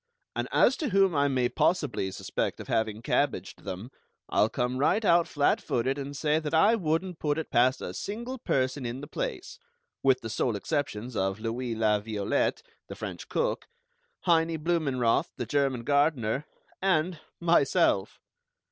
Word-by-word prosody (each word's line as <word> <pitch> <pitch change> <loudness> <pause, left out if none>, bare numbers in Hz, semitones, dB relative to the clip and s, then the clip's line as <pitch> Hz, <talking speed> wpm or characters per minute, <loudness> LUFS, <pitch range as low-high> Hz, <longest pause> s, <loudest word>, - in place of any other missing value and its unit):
And - - -2
as 265 - +4
to 300 - -2
whom 195 -2 +4
I 145 0 +3
may 130 -3 +1
possibly 130 - 0
suspect 95 - -3
of - - -8
having 110 -3 -1
cabbaged - - -1
them, 100 +6 -6 0.4
I'll 105 - +3
come 125 +1 -1
right 210 +10 +2
out 170 -2 +4
flat 145 -2 +2
footed 130 +4 -1
and 140 0 -5
say 150 +1 +2
that 155 0 -2
I 205 +8 +5
wouldn't 175 -3 -1
put 145 -1 0
it 160 - -4
past 130 +2 +3
a - - -5
single 235 +5 -5
person 130 - 0
in 120 +2 -4
the - - -7
place, - - -5 0.4
with 130 -1 +3
the 115 - -5
sole 120 0 0
exceptions 125 -1 -3
of 95 +1 -1
Louis 115 +1 -3
La 110 -1 +2
Violette, 110 - -1 0.2
the - - -7
French - - -7
cook, - - -1 0.5
Heinie 165 -2 +2
Blumenroth, 145 -8 +1
the 120 - -3
German 135 -1 0
gardener, 140 -2 +1 0.3
and 180 -3 +1 0.2
myself! 165 - +2
140 Hz, 160 wpm, -28 LUFS, 120-165 Hz, 0.5 s, I